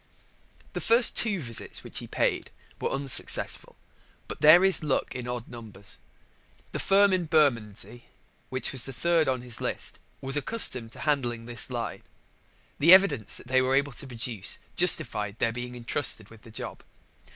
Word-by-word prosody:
The - - -4
first 235 +2 +4
two 210 -5 +3
visits 115 -4 -5
which - - -6
he - - -9
paid - - -1 0.3
were - - -2
unsuccessful: 135 -2 0 0.5
but - - -8
there 165 +5 +7
is 190 -4 +5
luck 150 -3 -1
in 125 -1 -6
odd 125 -1 -5
numbers. 110 -4 -8 0.7
The - - -4
firm 200 0 +3
in 180 -2 0
Bermondsey 120 - 0 0.4
which 130 0 -1
was 130 -3 +2
third 165 +5 0
on 130 -2 -1
his 120 -2 -5
list - - -3 0.2
was 135 +1 +1
accustomed 135 - +1
to - - -7
handling 120 -6 -1
this 120 +1 -4
line. 120 -2 -5 0.8
The 165 +5 +9
evidence 150 - +1
they 130 +1 +2
were 130 +1 +1
able 140 +1 +1
to 135 - -3
produce 115 -4 -3 0.2
justified 105 0 +1
their 115 - 0
being 125 +1 -7
entrusted 120 -3 +1
with 115 -1 -15
the 115 - -15
job. 110 - -7
130 Hz, 160 wpm, -27 LUFS, 115-150 Hz, 0.8 s, The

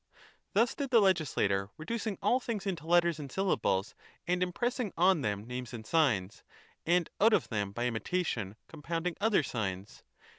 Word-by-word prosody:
Thus 230 +4 +3
did 280 -2 -3
the 240 -2 +6
legislator, 140 - +2
reducing 215 +5 -3
all 250 - +3
things 230 -5 -4
into 170 -5 -3
letters 170 -2 +3
and 140 -3 -7
syllables, 110 - 0 0.3
and 180 +1 0
impressing 235 +4 -1
on 180 -1 +4
them 105 -3 -2
names 125 0 -6
and 110 -2 -8
signs, 110 - +1 0.5
and 175 0 +3
out 220 +2 +5
of - - +2
them 100 -3 -2
by 120 +4 -2
imitation 115 - -2
compounding 165 +2 -3
other 210 -6 +3
signs. 100 -5 -4
165 Hz, 155 wpm, -31 LUFS, -, 0.5 s, the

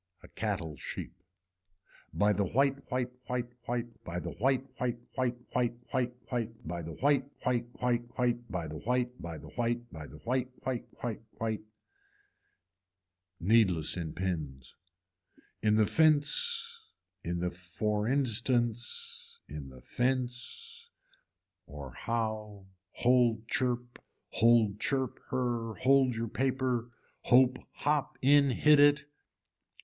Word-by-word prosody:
A - - -11
cattle 90 -9 -3
sheep. - - -6 1.0
By 105 0 +3
the 100 - +1
white 135 +7 +1
white 125 0 -1 0.2
white 125 -1 -2 0.2
white, 120 -1 -3
by 85 0 -4
the 85 0 -5
white 130 +3 +1 0.2
white 125 -1 0 0.2
white 125 -2 0 0.2
white 120 -1 +1 0.2
white 125 -2 +1 0.2
white, 115 -3 -3
by 85 +1 -3
the 80 0 -6
white 140 - +2 0.2
white 120 -2 +1
white 120 -1 0
white 120 -1 0
by 90 -3 -2
the 75 0 -6
white 125 +3 -1
by 85 -2 -5
the 75 - -11
white 120 - -2
white 130 -2 -2 0.2
white 115 -3 -3 0.2
white. 110 -1 -1 1.8
Needless 95 -5 +3
in 80 -3 -4
pins. 75 -8 -3 0.9
In 105 -1 +4
the 110 0 +5
fence 460 - +2 0.4
in 85 +1 -2
the 90 +1 -1
for 105 +4 -2
instance, 120 -2 +1
in 75 -2 -7
the 65 -1 -13
fence 125 - -2 0.8
or 70 -2 -8
how, 110 -3 -3 0.2
hold 120 -2 +3
chirp, 125 -1 -1 0.3
hold 110 -3 +4
chirp 130 -1 -1
her, 120 -3 -1
hold 130 -1 +4
your 115 +1 -2
paper, 130 -1 0 0.4
hope 130 +1 +5
hop 145 -1 0
in 140 +1 +6
hit 150 +3 +5
it. 145 0 +6
120 Hz, 120 wpm, -31 LUFS, 105-130 Hz, 1.8 s, in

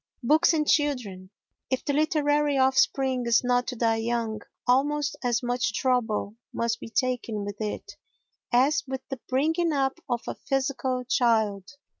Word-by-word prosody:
Books 310 +7 +4
and 305 -2 0
Children 240 -11 0 0.4
If 260 -1 -2
the 285 - 0
literary 295 -1 +2
offspring 265 -1 +2
is 235 +1 +4
not 245 0 +1
to 250 - -3
die 225 -1 +1
young, 225 -1 -2 0.2
almost 280 +2 +1
as 245 0 0
much 240 -4 -1
trouble 225 -4 0
must 230 0 -1
be - - -8
taken 230 -4 -1
with 205 +1 -7
it 210 -1 -5 0.5
as 280 +4 +3
with 265 0 -4
the 270 - -5
bringing 320 +6 +1
up 275 +1 0
of 240 -1 -1
a - - -2
physical 265 -2 -2
child. 220 -6 +1
255 Hz, 150 wpm, -26 LUFS, 230-275 Hz, 0.5 s, Books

